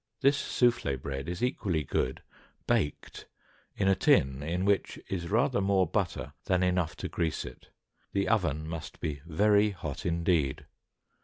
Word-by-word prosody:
This 140 +1 +4
soufflée 120 - +1
bread 70 +3 -4
is 90 +5 -4
equally 95 - 0
good 65 -1 -1 0.4
baked 75 - -1 0.5
in 100 - 0
a 95 - +6
tin 65 -6 +3
in 85 +5 -1
which 100 -1 +1
is 85 -3 -3
rather 120 +1 +2
more 95 -1 +3
butter 95 -3 -2
than 90 0 +2
enough 90 -3 +1
to - - -4
grease 80 -2 -2
it; - - -11 0.4
the 100 0 0
oven 80 -8 +1
must 80 -2 -6
be 75 -3 -3
very 105 +5 +4
hot 80 -8 -6
indeed. 85 -5 +1
90 Hz, 150 wpm, -29 LUFS, 75-100 Hz, 0.5 s, a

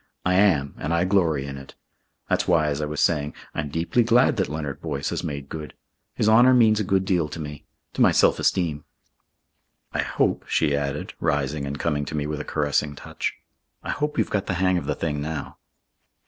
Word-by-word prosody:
I 90 - +3
am, 90 -8 +3
and 80 +3 -1
I 85 - +2
glory 85 -8 +2
in 70 -1 -6
it. 70 - -13 0.5
That's - - 0
why, 80 -4 +3
as 70 +1 -2
I 75 - -1
was 75 0 -4
saying, 75 -3 +1 0.2
I'm 75 - -3
deeply 80 +10 +1
glad 120 +2 +4
that 95 - 0
Leonard 75 -3 -4
Boyce 75 -3 -3
has - - -3
made 70 -1 -5
good. 75 +1 -7 0.4
His - - +1
honour 120 +4 +6
means 110 -3 +5
a - - +1
good 95 0 +1
deal 90 -5 +1
to 80 - -7
me 75 -2 -7 0.3
to - - -2
my - - +6
self - - +4
esteem. 80 -5 0 1.1
I - - -2
hope," - - 0
she 70 - +2
added, 70 0 -3
rising 70 0 -1
and 70 +1 -4
coming 75 0 -1
to 80 - -5
me 75 -1 -1
with 75 0 -3
a - - -3
caressing 75 0 -1
touch. - - -4 0.5
"I - - -3
hope 150 0 -2
you've - - 0
got 100 -2 -1
the 95 - -1
hang 90 0 +2
of 75 - -8
the - - 0
thing 75 -3 -2
now." 75 0 -5
75 Hz, 210 wpm, -24 LUFS, 75-95 Hz, 1.1 s, honour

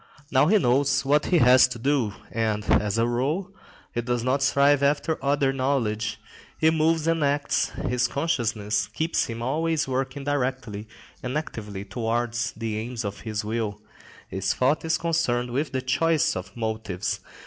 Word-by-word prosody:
Now 130 +3 +4
he 215 +5 +5
knows 135 -2 +2
what 145 +2 +3
he 180 - +3
has 125 -3 +7
to 125 -1 -6
do, 125 -3 0 0.2
and, 110 -2 -1
as 105 +1 +2
a 115 - +3
rule, 145 +11 -1 0.4
he 120 - -1
does 120 0 -1
not 130 +3 +1
strive 140 +1 +4
after 145 +2 +1
other 140 -1 +2
knowledge. 115 -5 -1 0.4
He 160 0 +4
moves 160 0 +2
and 165 -1 +1
acts; 145 0 +1 0.2
his 125 0 +1
consciousness 115 -8 -1
keeps 160 +1 0
him 115 0 -5
always 155 +4 0
working 135 +1 -2
directly 130 -7 -2 0.3
and 130 +3 -2
actively 105 -9 -6
towards 120 +3 -1
the 110 -1 -3
aims 115 0 -4
of 100 0 -4
his 110 -2 -4
will; 110 -2 -2 0.5
his 95 0 -1
thought 130 +4 +2
is 160 0 +1
concerned 140 -8 0
with 140 +5 -1
the 130 -1 -2
choice 150 +4 +2
of 95 +4 -7
motives. 110 -5 -2
125 Hz, 160 wpm, -25 LUFS, 110-145 Hz, 0.5 s, has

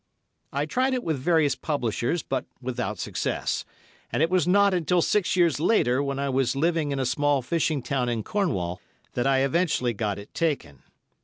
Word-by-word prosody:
I 140 +2 -1
tried 255 +10 +1
it 250 - -2
with 155 -4 -1
various 155 -1 +3
publishers, 135 +2 -1
but 130 -1 -2
without 125 -4 -3
success, - - -2 0.5
and 150 - +1
it 165 - +1
was 180 -3 +2
not 200 +1 +4
until 175 0 +2
six 205 -4 +1
years 170 -6 +3
later, 140 - +3
when 140 -1 -2
I 140 0 -1
was 135 -1 +1
living 160 0 +1
in 140 - -1
a 135 - 0
small 140 +1 +1
fishing 155 -1 0
town 125 -3 -1
in 115 -2 -1
Cornwall, 95 - -1 0.3
that 125 +2 0
I 135 -1 +3
eventually 140 -4 +1
got 105 -2 -2
it 100 - -11
taken. 140 - -2
140 Hz, 180 wpm, -26 LUFS, 125-170 Hz, 0.5 s, not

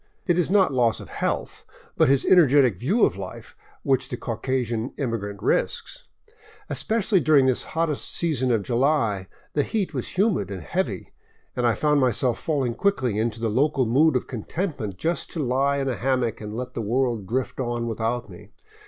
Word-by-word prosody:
It 175 -2 +2
is 175 - +1
not 190 -6 +3
loss 120 -3 +2
of - - -10
health, - - -3 0.3
but - - +4
his 140 -1 +3
energetic 140 - +5
view 195 - +3
of 90 - -1
life 95 -1 -8 0.3
which 130 -1 +1
the - - -4
Caucasian 120 0 -2
im 130 -5 -1
migrant 100 -2 -5
risks. - - -1 0.6
Especially 215 -3 +1
during 150 -5 +4
this 130 -2 +2 0.2
hottest 165 -3 -1
season 140 -7 0
of 110 -4 +1
January 115 -6 +1 0.3
the 145 - +2
heat 200 +5 -2
was - - -5
humid 195 - +2
and 95 -4 -6
heavy, - - -3 0.4
and 120 -1 +1
I 115 - +2
found 150 -2 +2
myself 125 -1 +1
falling 135 -7 -1
quickly 130 - 0
into 115 0 -1
the 115 -1 -1
local 135 +3 +2
mood 140 +6 +3
of 125 - 0
contentment 125 - -4
just 165 - -2
to 165 - -4
lie 140 +1 +1
in 135 -1 -1
a 130 - -1
hammock 125 -4 0
and 105 +1 -6
let 125 0 -5
the 115 - -3
world 115 -2 0
drift 130 +5 -2
on 120 -2 -2
without 115 +1 -2
me. 90 -4 -13
130 Hz, 180 wpm, -24 LUFS, 115-150 Hz, 0.6 s, energetic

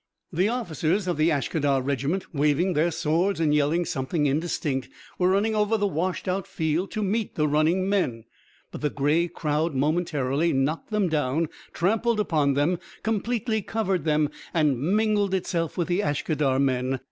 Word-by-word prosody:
The 185 +5 +2
officers 190 - -1
of 175 - 0
the 155 +2 +3
Ashkadar 145 -1 +1
regiment, 140 +8 -2
waving 150 +5 +2
their 160 +2 +2
swords 170 +4 0
and 155 -2 +2
yelling 150 +4 +2
something 145 +2 -1
indistinct, 145 -2 -1 0.3
were 180 0 +3
running 205 +4 +2
over 215 +1 +2
the 205 - 0
washed 185 0 -2
out 185 +1 -1
field 160 +4 -1
to 215 - -1
meet 210 +2 -1
the 150 -1 +1
running 160 +6 +2
men, 180 - 0 0.5
but - - -8
the 150 - +1
grey 150 +5 +1
crowd 155 -1 -1
momentarily 150 0 +1
knocked 140 +4 -1
them 210 -3 +1
down, 150 0 0 0.2
trampled 220 +5 +1
upon 150 -8 +1
them, 160 +5 +1 0.2
completely 220 +1 -1
covered 195 -5 -1
them, 150 -1 +1 0.2
and 150 -6 +2
mingled 205 +3 +2
itself 170 -3 -2
with 175 - 0
the 175 +1 +1
Ashkadar 145 -3 0
men. 130 -1 0
165 Hz, 160 wpm, -25 LUFS, 145-190 Hz, 0.5 s, the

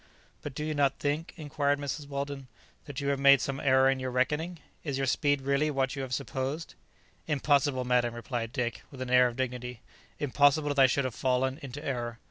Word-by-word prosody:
"But 145 -3 -7
do 150 - -3
you 155 - -1
not 145 -2 +2
think," 150 +3 -2
inquired 145 -2 0
Mrs. 145 +1 -4
Weldon, 140 -1 -4 0.4
"that 145 -1 -6
you 140 -1 -1
have 140 -1 0
made 140 0 +7
some 135 +2 -3
error 130 -1 +4
in 135 0 +2
your 130 0 -3
reckoning? 150 +7 0 0.3
Is 140 -4 -2
your 135 - 0
speed 145 +1 +1
really 140 +3 +1
what 135 -2 0
you 135 - -4
have 130 -2 -5
supposed?" 140 +4 -3 0.5
"Impossible, 140 -3 +2
madam," 120 -1 +2
replied 120 -1 -4
Dick, 120 -4 -2
with 135 - -12
an 125 - -6
air 125 0 +6
of 120 - -5
dignity, 125 -2 -4 0.4
"impossible 145 +1 +3
that 145 -1 0
I 135 - +8
should 135 +1 +1
have 130 - -2
fallen 130 +2 0
into 140 +2 -7
error. 120 -3 -3
135 Hz, 205 wpm, -29 LUFS, 130-145 Hz, 0.5 s, I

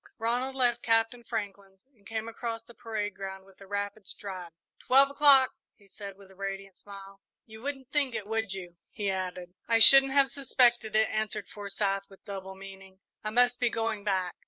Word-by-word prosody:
Ronald 245 +4 -1
left 245 -2 +2
Captain 225 +1 +1
Franklin's 200 -4 -6
and 200 -3 -19
came 225 0 -4
across 230 0 -5
the 235 - -16
parade 215 -3 -4
ground 190 0 -7
with 195 0 -21
a 195 - -12
rapid 205 0 -4
stride. 185 -4 -6 0.3
"Twelve 275 +2 +5
o'clock!" 280 -2 +6 0.2
he 200 - -24
said, 200 0 -9
with 195 -1 -16
a - - -18
radiant 195 0 -6
smile. 195 -1 -12 0.2
"You 220 0 -12
wouldn't 270 -1 -6
think 280 -5 +1
it, 215 -2 -3
would 225 -1 -2
you?" 180 -3 -6
he 205 -2 -2
added. 180 -1 -5
"I 230 - +4
shouldn't 270 +4 +8
have 275 -1 +4
suspected 240 -5 +2
it," 220 0 +4
answered 215 -1 -3
Forsyth, 195 -1 -3
with 195 - -18
double 190 -2 -7
meaning; 195 0 -12 0.2
"I 215 - -2
must 245 +2 +3
be 245 -1 +2
going 225 -2 -2
back." 185 -3 0
210 Hz, 185 wpm, -29 LUFS, 195-235 Hz, 0.3 s, shouldn't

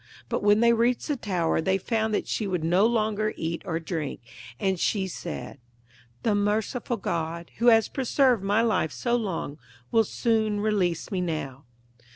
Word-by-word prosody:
But - - -1
when 205 +1 +4
they 235 0 +5
reached 235 +5 +1
the 295 - +1
tower 180 -9 0
they 190 +4 +1
found 220 +2 -1
that - - -2
she 215 - -1
would 180 -4 -2
no 180 +6 +4
longer 215 -2 0
eat 165 +1 -3
or 165 -1 -1
drink, 160 -3 -4 0.4
and 190 -2 0
she 195 +1 +1
said, 125 -7 -6 0.6
'The 220 - +2
merciful 215 +4 0
God, 170 -2 -3
who 235 - +1
has 225 -2 +6
preserved 260 -4 +2
my 205 +3 +2
life 220 -9 +1
so 240 - -1
long, 185 -9 -3 0.3
will 225 - +5
soon 220 -1 0
release 195 -6 0
me 190 -2 -1
now.' 150 -6 -4
205 Hz, 170 wpm, -26 LUFS, 170-225 Hz, 0.6 s, has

